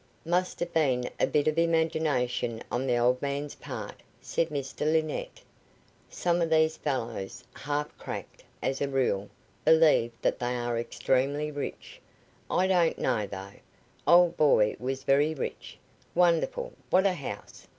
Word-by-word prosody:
"Must 180 +2 0
have 175 0 -3
been 130 -6 +2
a - - +3
bit 150 0 +1
of 155 +1 +2
imagination 160 -8 0
on 130 +2 -1
the 120 -1 +2
old 125 +1 +2
man's 140 +1 -3
part," - - -8 0.2
said 165 - -1
Mr 140 -3 -5
Linnett. 160 - -1 0.7
"Some 175 0 0
of 165 - +1
these 160 0 +3
old - - -31
fellows 120 -6 -3
half 145 +2 -3
cracked, - - -7 0.2
as 135 - -1
a 140 - +1
rule 120 -7 0 0.3
believe 155 -7 +5
that - - +1
they 125 0 -1
are 120 -1 -1
extremely 140 +5 0
rich. 145 -1 -6 0.5
I 185 - +2
don't 180 -3 +3
know, 105 -2 0
though. 100 0 -8 0.5
Old 175 0 +6
boy 110 -8 +4
was 135 +1 -3
very 145 +3 +3
rich. 135 - -6 0.4
Wonderful! 180 - +2 0.2
What 185 +2 +4
a 195 - +4
house! 145 -7 -8
145 Hz, 150 wpm, -28 LUFS, 125-165 Hz, 0.7 s, Old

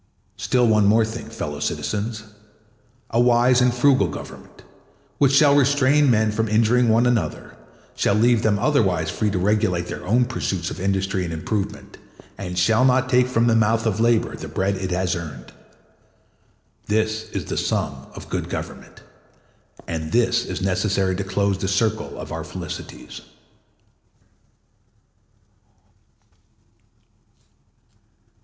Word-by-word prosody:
Still 125 -1 +1
one 110 -1 +3
thing 100 - +4
more, 110 +1 +4
fellow 110 -10 -6
citizens—a 110 +5 -6
wise 120 +1 +4
and 125 0 +4
frugal 130 +2 +3
Government, - - -10 0.6
which 140 -2 +4
shall 145 0 +5
restrain 145 +1 +3
men 110 -2 +2
from 110 +1 -1
injuring 115 +3 +3
one 115 +2 +3
another, 115 -11 -1 0.4
shall 100 - +1
leave 115 +1 +3
them 105 -2 +2
otherwise 95 - +1
free 105 - -1
to 100 - -2
regulate 95 -2 +1
their - - -7
own 120 +6 +2
pursuits 95 -8 -3
of - - -7
industry 95 0 -1
and 85 - -4
improvement, 95 +5 -4 0.4
and 90 -2 -6
shall 110 +7 +3
not 130 0 +3
take 125 -1 +3
from 120 -2 +1
the 115 -1 +3
mouth 115 0 +2
of 110 -2 0
labor 115 -1 +2
the - - -8
bread 95 +1 -1
it 95 -1 -4
has 90 0 -1
earned. 75 -7 -8 1.3
This 110 +1 -1
is - - -5
the - - -4
sum - - -2
of - - -10
good - - -4
government, - - -8 0.8
and 80 -1 -4
this 120 0 +2
is - - -4
necessary 95 0 0
to 100 - -3
close 95 0 -1
the 95 - -2
circle 110 +2 -1
of - - -8
our - - -4
felicities. - - -8
110 Hz, 135 wpm, -22 LUFS, 95-120 Hz, 1.3 s, shall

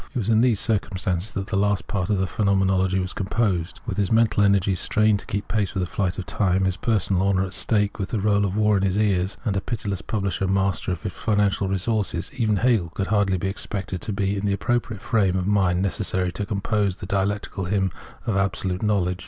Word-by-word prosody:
It - - 0
was 115 -3 -1
in 110 0 +4
these 120 -5 +3
circumstances 95 -3 -1
that 95 - -3
the 100 - -3
last 100 0 +1
part 100 -2 -2
of 105 - +2
the 95 - +1
Phenomenology 95 -1 +1
was 95 0 -2
composed. 95 -3 -1
With - - -4
his 100 -2 0
mental 110 -2 +3
energies 100 -2 +3
strained 110 -1 +2
to - - -13
keep 100 +1 -3
pace 105 -3 -1
with 95 - 0
the - - 0
flight 95 0 -2
of 95 - -4
time, 95 -1 +1
his 95 -1 0
personal 100 -4 0
honour 95 -1 +2
at 95 - -7
stake, 105 0 0
with 95 - -2
the 115 - -1
roll 100 0 +2
of 100 0 -1
war 105 -1 +3
in - - 0
his 95 0 +1
ears, 100 -3 +1
and 105 -4 0
a 95 - 0
pitiless 100 -5 -3
publisher 100 -3 -2
master 95 -1 0
of 85 +1 -4
his 100 -5 -4
financial 100 -1 +1
resources 95 -1 -1
— - - -17
even 110 -4 +1
Hegel 110 -7 +2
could 95 +3 -3
hardly 100 -3 +2
be 95 - -2
expected 95 -2 -4
to 110 - -4
be 100 0 0
in 100 - -3
the 100 - +1
appropriate 110 0 -1
frame 100 -7 +2
of 90 - -1
mind 95 -3 +2
necessary 95 -2 -1
to 100 +3 -4
compose 100 -2 0
the - - -8
dialectic 100 +2 -1
hymn 95 -1 +1 0.3
of 110 - 0
Absolute 95 -1 -1
Knowledge. 95 -4 +1
100 Hz, 225 wpm, -24 LUFS, 95-105 Hz, 0.3 s, in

